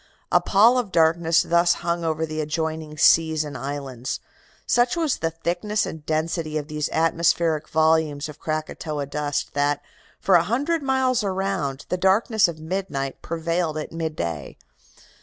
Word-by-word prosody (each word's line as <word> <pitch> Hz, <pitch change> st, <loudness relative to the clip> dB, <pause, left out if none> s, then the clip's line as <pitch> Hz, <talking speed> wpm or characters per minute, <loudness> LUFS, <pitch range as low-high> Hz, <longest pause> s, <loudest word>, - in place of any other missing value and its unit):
"A -, -, +5 dB
pall 230 Hz, +6 st, +5 dB
of 220 Hz, -6 st, -4 dB
darkness 165 Hz, 0 st, +3 dB
thus 170 Hz, +1 st, +3 dB
hung 170 Hz, 0 st, 0 dB
over 160 Hz, 0 st, 0 dB
the 155 Hz, 0 st, -3 dB
adjoining 155 Hz, 0 st, -3 dB
seas 160 Hz, 0 st, +4 dB
and 150 Hz, -1 st, -7 dB
islands. 135 Hz, -3 st, -4 dB, 0.5 s
Such 240 Hz, +5 st, +2 dB
was 320 Hz, -5 st, +1 dB
the 165 Hz, -, -1 dB
thickness 175 Hz, +6 st, -1 dB
and 160 Hz, -2 st, -7 dB
density 155 Hz, 0 st, -1 dB
of 150 Hz, -1 st, -4 dB
these 150 Hz, -1 st, -2 dB
atmospheric 165 Hz, -1 st, +1 dB
volumes 155 Hz, -2 st, +2 dB
of 150 Hz, -1 st, -11 dB
Krakatoa 155 Hz, -1 st, -3 dB
dust 145 Hz, 0 st, -3 dB
that, 145 Hz, 0 st, 0 dB, 0.4 s
for 195 Hz, -, +1 dB
a 170 Hz, -2 st, +6 dB
hundred 290 Hz, +8 st, 0 dB
miles 260 Hz, -3 st, +1 dB
around, 190 Hz, -8 st, -2 dB
the 180 Hz, -, 0 dB
darkness 200 Hz, +3 st, +3 dB
of 165 Hz, -2 st, -6 dB
midnight 155 Hz, -5 st, -4 dB
prevailed 165 Hz, -1 st, -2 dB
at 155 Hz, -, -5 dB
midday. 150 Hz, -, -4 dB
160 Hz, 150 wpm, -23 LUFS, 150-180 Hz, 0.5 s, a